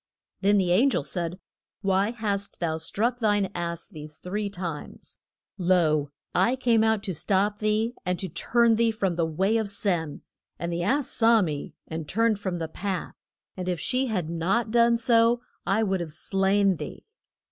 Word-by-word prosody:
Then 205 Hz, +1 st, +3 dB
the 185 Hz, -3 st, +2 dB
an 230 Hz, +10 st, +5 dB
gel 205 Hz, -, 0 dB
said, 170 Hz, +4 st, -3 dB, 0.4 s
Why 195 Hz, 0 st, +2 dB
hast 205 Hz, -4 st, -3 dB
thou 160 Hz, -2 st, -1 dB
struck 230 Hz, +9 st, -1 dB
thine 205 Hz, -4 st, +1 dB
ass 170 Hz, -1 st, -3 dB
these 150 Hz, -1 st, -10 dB
three 205 Hz, +3 st, -3 dB
times? 175 Hz, -6 st, -7 dB, 0.4 s
Lo, 165 Hz, -5 st, +2 dB, 0.2 s
I 195 Hz, +8 st, +3 dB
came 235 Hz, -4 st, +3 dB
out 220 Hz, -2 st, +2 dB
to 190 Hz, -, -2 dB
stop 200 Hz, +5 st, +1 dB
thee, 215 Hz, +2 st, +1 dB
and 180 Hz, 0 st, -1 dB
to 190 Hz, -, -5 dB
turn 230 Hz, +6 st, +2 dB
thee 230 Hz, 0 st, +3 dB
from 195 Hz, -5 st, -1 dB
the 165 Hz, -1 st, +1 dB
way 190 Hz, +8 st, +1 dB
of 220 Hz, -2 st, -1 dB
sin. 175 Hz, -7 st, -1 dB, 0.3 s
And 170 Hz, 0 st, -3 dB
the 170 Hz, -, -2 dB
ass 265 Hz, +9 st, +1 dB
saw 225 Hz, -2 st, +4 dB
me, 150 Hz, -4 st, -4 dB
and 160 Hz, -2 st, -6 dB
turned 225 Hz, -1 st, +2 dB
from 185 Hz, -3 st, -3 dB
the 165 Hz, -1 st, -3 dB
path, 185 Hz, +2 st, -4 dB, 0.4 s
and 185 Hz, -1 st, -4 dB
if 175 Hz, -2 st, -1 dB
she 260 Hz, +9 st, 0 dB
had 185 Hz, -8 st, -1 dB
not 185 Hz, +8 st, 0 dB
done 235 Hz, 0 st, +4 dB
so 235 Hz, 0 st, +3 dB, 0.3 s
I 210 Hz, +3 st, +2 dB
would 190 Hz, -3 st, 0 dB
have 165 Hz, -3 st, -4 dB
slain 195 Hz, +2 st, +2 dB
thee. -, -, -8 dB
195 Hz, 180 wpm, -26 LUFS, 175-220 Hz, 0.4 s, an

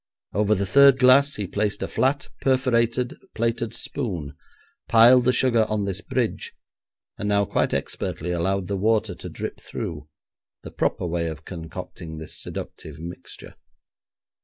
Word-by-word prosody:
Over 105 Hz, +2 st, +2 dB
the 100 Hz, 0 st, -1 dB
third 140 Hz, +7 st, +6 dB
glass 135 Hz, +2 st, +5 dB
he 105 Hz, -, -3 dB
placed 105 Hz, +2 st, -1 dB
a -, -, -2 dB
flat 140 Hz, +2 st, 0 dB
perforated 125 Hz, -2 st, +1 dB, 0.2 s
plated 115 Hz, 0 st, -1 dB
spoon, 90 Hz, -, -4 dB, 0.5 s
piled 120 Hz, +2 st, +7 dB
the 125 Hz, -, +5 dB
sugar 120 Hz, -4 st, +3 dB
on 105 Hz, -2 st, 0 dB
this 100 Hz, 0 st, -3 dB
bridge, 125 Hz, -3 st, -2 dB, 0.7 s
and 105 Hz, -, -2 dB
now 100 Hz, 0 st, +3 dB
quite -, -, 0 dB
expertly 90 Hz, +3 st, -3 dB
allowed 90 Hz, +2 st, 0 dB
the 100 Hz, 0 st, -2 dB
water 110 Hz, 0 st, +1 dB
to -, -, -9 dB
drip -, -, -6 dB
through, 75 Hz, -2 st, -6 dB, 0.5 s
the -, -, -8 dB
proper -, -, -1 dB
way 85 Hz, -1 st, -1 dB
of 80 Hz, -1 st, -7 dB
concocting 80 Hz, -1 st, -8 dB
this 80 Hz, 0 st, -6 dB
seductive -, -, -7 dB
mixture. 85 Hz, +3 st, -9 dB
105 Hz, 145 wpm, -24 LUFS, 90-125 Hz, 0.7 s, piled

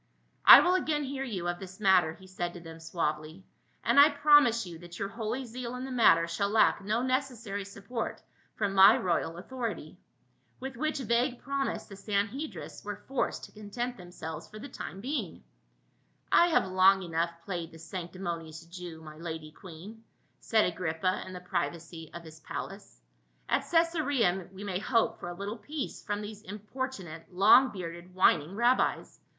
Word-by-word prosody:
" -, -, -42 dB
I -, -, +13 dB
will 360 Hz, -, +3 dB
again 310 Hz, -5 st, +1 dB
hear 270 Hz, 0 st, -4 dB
you 195 Hz, -9 st, -4 dB
of 175 Hz, 0 st, -2 dB
this 190 Hz, 0 st, -10 dB
mat 190 Hz, -3 st, +6 dB
ter," 160 Hz, -1 st, -4 dB
he 190 Hz, -, -16 dB
said 175 Hz, -2 st, -4 dB
to -, -, -7 dB
them 165 Hz, -1 st, -11 dB
suavely; 160 Hz, +1 st, -3 dB, 0.4 s
"and -, -, +4 dB
I 290 Hz, +2 st, +9 dB
promise 290 Hz, -7 st, +5 dB
you 170 Hz, -2 st, -9 dB
that 175 Hz, 0 st, -11 dB
your 200 Hz, -, -3 dB
holy 230 Hz, +4 st, -4 dB
zeal 245 Hz, +1 st, -6 dB
in 250 Hz, +1 st, -5 dB
the 265 Hz, -, -7 dB
matter 170 Hz, -9 st, +5 dB
shall 200 Hz, +4 st, -1 dB
lack 215 Hz, -1 st, +4 dB
no 215 Hz, +4 st, 0 dB
neces 260 Hz, 0 st, 0 dB
sary 205 Hz, -3 st, -5 dB
support 200 Hz, +4 st, -5 dB, 0.4 s
from 205 Hz, -2 st, -1 dB
my 195 Hz, +2 st, +8 dB
royal 170 Hz, -2 st, -1 dB
authority." 240 Hz, +5 st, -5 dB, 0.6 s
With 265 Hz, 0 st, -6 dB
which 305 Hz, +5 st, -1 dB
vague 240 Hz, +1 st, +1 dB
promise 275 Hz, 0 st, -2 dB
the -, -, -12 dB
Sanhedrists 200 Hz, -, -3 dB
were 205 Hz, 0 st, -6 dB
forced 270 Hz, -1 st, -1 dB
to -, -, -10 dB
content 240 Hz, +4 st, -5 dB
themselves 165 Hz, -4 st, -8 dB
for 215 Hz, -, -11 dB
the 245 Hz, +6 st, -8 dB
time 195 Hz, -7 st, -8 dB
being. 245 Hz, -, -4 dB, 0.5 s
" -, -, -41 dB
I 345 Hz, -, +6 dB
have 330 Hz, -, +3 dB
long 190 Hz, +1 st, +4 dB
enough 170 Hz, 0 st, -1 dB
played 170 Hz, -4 st, -4 dB
the 165 Hz, -, -12 dB
sanctimonious 170 Hz, -1 st, -6 dB
Jew, 170 Hz, -2 st, -9 dB
my 155 Hz, -1 st, -11 dB
lady 160 Hz, -2 st, -6 dB
queen," 190 Hz, +7 st, -12 dB, 0.4 s
said 220 Hz, -1 st, +2 dB
Agrippa 180 Hz, +1 st, -1 dB
in 185 Hz, -, -8 dB
the 180 Hz, -, -7 dB
privacy 165 Hz, -2 st, -4 dB
of 170 Hz, -, -7 dB
his 160 Hz, -1 st, -12 dB
24G -, -, -31 dB
PAUL. -, -, -7 dB
palace. -, -, -7 dB, 0.5 s
"At -, -, +2 dB
Cacsarea 285 Hz, -, +1 dB
we 195 Hz, +1 st, -9 dB
may 185 Hz, -3 st, -2 dB
hope 225 Hz, +1 st, +1 dB
for 175 Hz, -, -6 dB
a 175 Hz, -, -6 dB
little 200 Hz, +4 st, -5 dB
peace 290 Hz, +6 st, -5 dB
from 205 Hz, -2 st, -3 dB
these 210 Hz, 0 st, -8 dB
importunate 205 Hz, -, -6 dB
long 215 Hz, +8 st, +6 dB
bearded 175 Hz, -2 st, -8 dB
whining 175 Hz, -1 st, +3 dB
rabbis. 240 Hz, +3 st, +1 dB
195 Hz, 180 wpm, -30 LUFS, 170-240 Hz, 0.6 s, I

